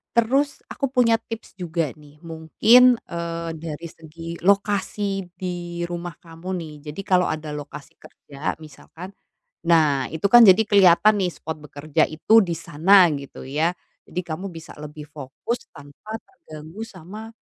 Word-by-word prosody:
Terus, 270 +5 +1
aku 275 - -2
punya 245 -3 +3
tips 225 -4 -10
juga 165 -4 -2
nih, 150 0 -18
mungkin, 220 +10 +5
eee, 170 0 -5
dari 165 +1 -6
segi 165 +1 -9
lokasi 200 0 0
di 175 -1 -5
rumah 175 -1 -5
kamu 170 +3 -6
nih. 160 -4 -6
Jadi 150 +6 -5
kalau 185 -3 +2
ada 155 -1 -4
lokasi 145 -1 -9
kerja 140 +2 -6
misalkan, 165 +5 -11 0.5
nah, 155 -6 +3
itu 160 +5 -1
kan 240 +4 +8
jadi 195 -2 +8
kelihatan 200 +1 +5
nih 180 - 0
spot 160 -1 -6
bekerja 150 +1 -1
itu 220 +8 +4
di 170 -3 -3
sana, 180 +4 +5
gitu 140 -2 -8
ya. 155 +5 +1 0.3
Jadi 180 - -5
kamu 180 +5 -5
bisa 165 -2 -11
lebih 150 0 -9
fokus 150 - -6
tanpa 145 +10 -10
terganggu 165 - -12
sama, 210 +2 -9
170 Hz, 145 wpm, -23 LUFS, 155-200 Hz, 0.5 s, kan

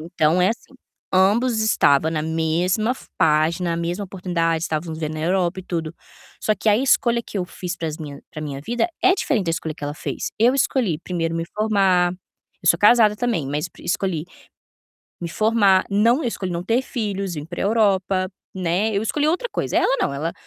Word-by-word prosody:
Então 165 +1 +1
é 185 - +4
assim, 230 +4 -5 0.4
ambos 220 +5 +3
estava 160 -8 +3
na 160 -1 -1
mesma 165 +7 0
f 260 - -5
página, 165 +3 +2
a - - -2
mesma 170 +4 -2
oportunidade, 175 -4 -1
estávamos 160 -1 -3
vivendo 155 -1 -3
na 155 - -5
Europa 180 +1 0
e - - -12
tudo. 165 -3 -4 0.5
Só 215 - +2
que 210 +2 -2
a 210 - +5
escolha 240 -1 +2
que 210 - -6
eu 180 - -1
fiz 175 -1 -6
para 165 - -3
as 155 - -5
minha 145 -3 -8
para 155 - -7
minha 140 -2 -5
vida 240 - -1
é 375 0 +5
diferente 275 - 0
da - - +1
escolha 160 -1 -3
que 150 - -17
ela 145 +1 -4
fez. - - -4
Eu 240 +4 +4
escolhi 250 - +1
primeiro 165 -1 -3
me 165 0 -2
formar, 195 -5 +2 0.5
eu 175 - +2
sou 170 - +5
casada 210 0 +5
também, 220 - -1
mas 150 +5 -2
escolhi 175 -2 -1 1.0
me 170 - -4
formar, 205 -1 +3
não 230 +8 +3
eu 245 - 0
escolhi 185 -5 -4
não 170 0 -3
ter 230 +6 +1
filhos, 200 -7 -3
vim 150 -2 -5
para 175 +1 -5
Europa, 195 -3 +2 0.3
né, 185 +3 0
eu 200 - +1
escolhi 290 +7 0
outra 365 +10 0
coisa. - - -2
Ela 270 - +3
não, - - 0
ela 155 +5 -3
185 Hz, 200 wpm, -22 LUFS, 165-215 Hz, 1.0 s, a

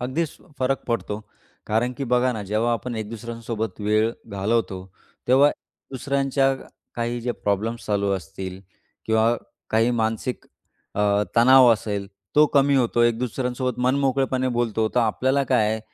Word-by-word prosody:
अगदीच 140 +6 -2 0.2
फरक 135 +1 0
पडतो. 110 -3 -2 0.5
कारण 115 +4 +1
की 140 - -3
बघा 125 +1 +2
ना, 110 -3 -5
जेव्हा 110 +4 0
आपण 120 +2 -3
एक 110 -1 -4
दुसऱ्यांसोबत 115 -3 -5
वेळ 110 +2 +2 0.2
घालवतो, 100 -2 -1 0.4
तेव्हा 140 +3 +6 0.4
दुसऱ्यांच्या 135 0 +1 0.4
काही 120 0 -2
जे 120 +1 -2
प्रॉब्लेम्स 110 +3 -2
चालू 100 -1 0
असतील 95 0 -6 0.5
किंवा 110 +1 +3 0.3
काही 115 +2 +3
मानसिक 115 +1 -2 0.5
अ, - - -1 0.4
तणाव 130 +2 +7
असेल, 100 -2 -3 0.3
तो 150 - +8
कमी 140 0 +4
होतो. 120 -2 +2
एक 120 -1 +3
दुसऱ्यांसोबत 125 0 -2
मन 130 +1 +2
मोकळेपणे 130 -1 +1
बोलतो, 110 -2 +1
तर 125 - +4
आपल्याला 130 +5 +1
काय 105 -1 +3
आहे, 110 0 -2
115 Hz, 145 wpm, -23 LUFS, 110-130 Hz, 0.5 s, तो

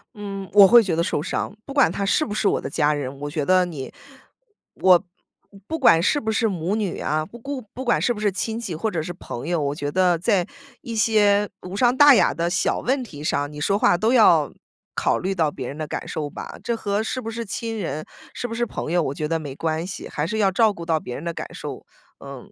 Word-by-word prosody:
嗯， 195 -2 -6
我 200 -2 +9
会 235 +2 +7
觉 180 -5 -1
得 170 - +1
受 150 - -1
伤， 195 - -3
不 275 - -8
管 280 - +4
他 200 +2 -2
是 205 - +2
不 210 - -4
是 215 -1 +1
我 - - +1
的 - - -5
家 150 -1 +2
人， 140 -1 -5
我 145 - -3
觉 150 -1 -2
得 185 +2 +4
你 150 -7 -7 0.8
我 180 -1 +5 0.6
不 320 +1 -3
管 165 - +6
是 290 - +2
不 220 0 -1
是 225 +1 +1
母 185 0 -2
女 205 -5 -2
啊， 155 0 -1
不 235 +7 -13
顾 275 +2 -5
不 260 - -6
管 240 - +2
是 240 - +1
不 215 - -8
是 210 -2 +1
亲 220 +4 -3
戚 195 -8 -5
或 215 +8 -2
者 170 -4 -2
是 165 - -5
朋 120 -8 -7
友， 175 -2 0
我 140 -1 -1
觉 145 -1 -4
得 180 0 +3
在 185 -1 +2 0.4
一 235 -4 -6
些 210 -2 +3
无 180 +1 -7
伤 240 +4 +3
大 290 0 +9
雅 235 - +4
的 170 0 -2
小 180 +2 0
问 260 +1 0
题 150 -11 -10
上， 145 -1 -1
你 150 - -9
说 195 +6 +1
话 175 - +4
都 220 +6 +1
要 170 - +5 0.4
考 - - +1
虑 190 +2 -2
到 165 -5 +1
别 130 -3 -6
人 145 - -7
的 155 - -3
感 - - -5
受 150 -2 -4
吧？ - - -8
这 235 - -1
和 205 -1 -1
是 225 +3 -3
不 225 -2 -5
是 230 +1 -4
亲 225 +2 -4
人、 155 -5 -4 0.3
是 245 - -3
不 230 - -6
是 240 +1 -1
朋 155 - -5
友， 175 0 +3
我 140 -4 -2
觉 155 - -2
得 165 +1 -1
没 145 -4 -7
关 160 +2 -2
系， 190 - -7
还 150 +2 -3
是 215 +5 -3
要 195 -3 +3
照 220 +3 +4
顾 170 -4 -8
到 160 -2 +1
别 125 - -7
人 145 - -7
的 170 0 -3
感 - - -6
受， - - -7 0.4
嗯， 140 -2 -10
185 Hz, 275 characters per minute, -23 LUFS, 155-220 Hz, 0.8 s, 我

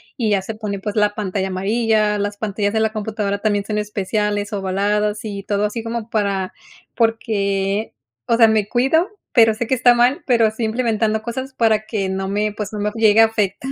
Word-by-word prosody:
y 230 -5 -1
ya 195 -2 +1
se 225 - -5
pone, 210 -2 -4
pues, 205 +1 -5
la 210 -1 +2
pantalla 195 -2 -2
amarilla. 210 +2 +1
Las 205 0 -2
pantallas 205 -1 -2
de 220 - +1
la 220 - +1
computadora 210 -2 -2
también 205 -1 0
son 210 0 -2
especiales, 210 0 -2
ovaladas 205 +2 0
y 200 -2 -5
todo 205 +1 -1
así, 215 +2 -3
como 230 0 -4
para 200 -3 -1 0.4
porque, 210 -3 0 0.3
o 230 - +3
sea, 230 - +7
me 215 -2 +1
cuido, 270 - +2 0.2
pero 225 -3 +5
sé 240 +2 -2
que - - 0
está 245 -1 +5
mal, 245 +4 +3
pero 235 -3 +4
estoy 220 +2 -3
implementado 220 -1 0
cosas 260 +3 -5
para 220 -3 +2
que 200 -4 -2
no 190 0 -3
me, 210 +2 0
pues, 210 0 -5
no 210 - -4
me 210 +1 -1
llegue 220 -1 +5
a - - +8
afectar 220 +4 -2
215 Hz, 200 wpm, -20 LUFS, 205-225 Hz, 0.4 s, a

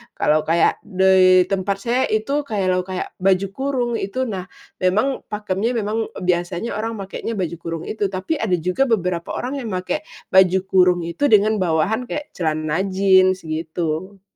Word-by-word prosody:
Kalau 155 0 +2
kayak 165 +1 +2
di 185 -1 +5
tempat 195 +1 -1
saya 245 +2 +1
itu 275 +7 0
kayak 205 -5 -1
lo 185 0 +1
kayak 185 -1 -4
baju 190 +1 +2
kurung 260 +1 -2
itu 230 +7 -2
nah 185 -4 -5 0.4
memang 215 +9 +1
pakemnya 210 +2 -2
memang 220 0 -1 0.2
biasanya 175 +4 -1
orang 225 +1 -3
makeknya 195 +3 -5
baju 175 -4 -2
kurung 165 -1 -5
itu, 210 -2 -1
tapi 190 +11 -3
ada 195 -5 +1
juga 180 +11 0
beberapa 180 -4 -1
orang 275 +3 -3
yang 240 - -5
makek 185 +12 -2 0.3
baju 190 0 +5
kurung 180 -2 +4
itu 285 +12 0
dengan 215 -1 +4
bawahan 180 +7 +1
kek 295 +3 -5
celana 155 +1 -1
jeans, 185 -1 +4
gitu. 160 +4 -4
190 Hz, 160 wpm, -21 LUFS, 180-220 Hz, 0.4 s, di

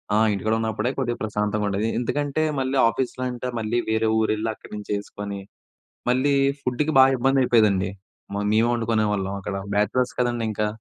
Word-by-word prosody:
ఆ! - - +4 0.2
ఇంటికాడ 110 +2 -1
ఉన్నప్పుడే 110 +2 -1
కొద్దిగా 120 -3 -1
ప్రశాంతంగా 105 0 -1
ఉండేది. 105 +3 0
ఎందుకంటే, 145 +4 -1 0.2
మళ్ళీ 130 +1 0
ఆఫీస్‌లో 130 +1 -3
అంటే 125 +1 -5
మళ్ళీ 110 +2 -1
వేరే 110 0 +2
ఊరు 110 - +1
వెళ్లి 110 +1 -2
అక్కడినుంచి 105 -1 -10
చేసుకొని, 100 0 -6 0.7
మళ్ళీ 130 +3 +2 0.3
ఫుడ్‌కి 145 +5 0
బాగా 130 0 +7
ఇబ్బంది 135 +2 +3
అయిపోయేదండి 100 -6 +3 0.4
మ - - -2 0.2
మేమే 110 +2 +3
వండుకునేవాళ్ళం 105 -4 0
అక్కడ 100 +1 -4 0.2
బ్యాచలర్స్ 115 +5 +1
కదండీ 120 -2 0
ఇంకా. 105 0 -1
110 Hz, 155 wpm, -24 LUFS, 105-125 Hz, 0.7 s, బాగా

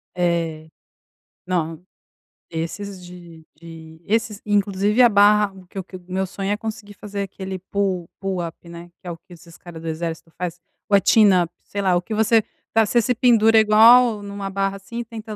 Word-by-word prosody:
É. 165 -3 -1 0.8
Não. 165 -2 -2 0.7
Esses 180 +4 -5
de 170 -3 -13
de 160 -1 -12
esses 215 -1 -1
inclusive 205 +2 +1
a 240 - +7
barra, 205 -1 +4 0.2
que - - -12
o 190 - -3
que 185 0 -10
o 175 - -19
meu 190 +1 -1
sonho 195 +2 -4
é - - +2
conseguir 215 -2 -7
fazer 200 0 -6
aquele 190 -1 -7
pull 185 -2 -2
pull 195 -1 -2
up, 165 - -8
né, 170 +1 -10
que 180 - -12
é - - -3
o 165 - -7
que 175 - -18
esses 170 0 -15
cara 170 -2 -11
do 165 - -8
exército 165 0 -5
faz. 175 -1 -4 0.3
Ou 200 - +5
é - - +1
chin 215 -3 +6
up, 175 -1 +1
sei 200 - -4
lá, 185 -2 +2
o - - -1
que 215 - -7
você 220 +1 +3 0.3
tá 225 -1 +4
você 235 +3 +2
se 250 - +1
pendura 225 -2 +4
igual 220 +1 +6
numa 200 -1 -6
barra, 195 0 -2
assim, 230 +5 -8
e 240 - -4
tenta 220 -1 -8
195 Hz, 200 wpm, -21 LUFS, 175-210 Hz, 0.8 s, a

